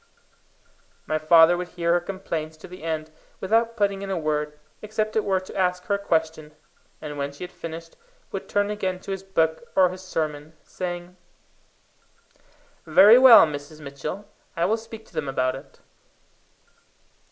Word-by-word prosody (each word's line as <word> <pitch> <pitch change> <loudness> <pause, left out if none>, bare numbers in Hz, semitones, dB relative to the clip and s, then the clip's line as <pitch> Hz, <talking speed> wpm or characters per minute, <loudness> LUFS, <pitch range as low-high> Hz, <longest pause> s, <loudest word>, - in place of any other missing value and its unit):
My 155 0 -1
father 165 +2 +6
would 180 0 -4
hear 170 -1 0
her 175 - +3
complaints 170 -4 -5
to - - -12
the 180 +1 -12
end 160 -1 -4 0.3
without 230 +4 +1
putting 200 -2 0
in 200 - -5
a 190 - -1
word, 150 -1 -2 0.2
except 215 0 -3
it 220 - +2
were 190 -2 +1
to 185 - -12
ask 180 -1 0
her 200 - -1
a 200 - 0
question, 160 -5 -2 0.4
and 150 -2 -7
when 140 0 -2
she 140 - -10
had 180 - -7
finished, 165 0 -9 0.4
would - - -6
turn 205 0 +1
again 190 -3 -2
to 195 - -7
his 195 -1 -3
book 165 -2 0
or 185 -1 +5
his 185 +1 -8
sermon, 155 -4 -4
saying 175 0 -6 1.7
"Very 220 +5 +8
well, 255 -7 +9
Mrs. 150 0 -7
Mitchell; 150 +8 -7 0.3
I 165 - +2
will 220 - +2
speak 225 0 -11
to - - -23
them 145 - -3
about 130 -1 0
it." 135 - -13
175 Hz, 165 wpm, -24 LUFS, 155-195 Hz, 1.7 s, well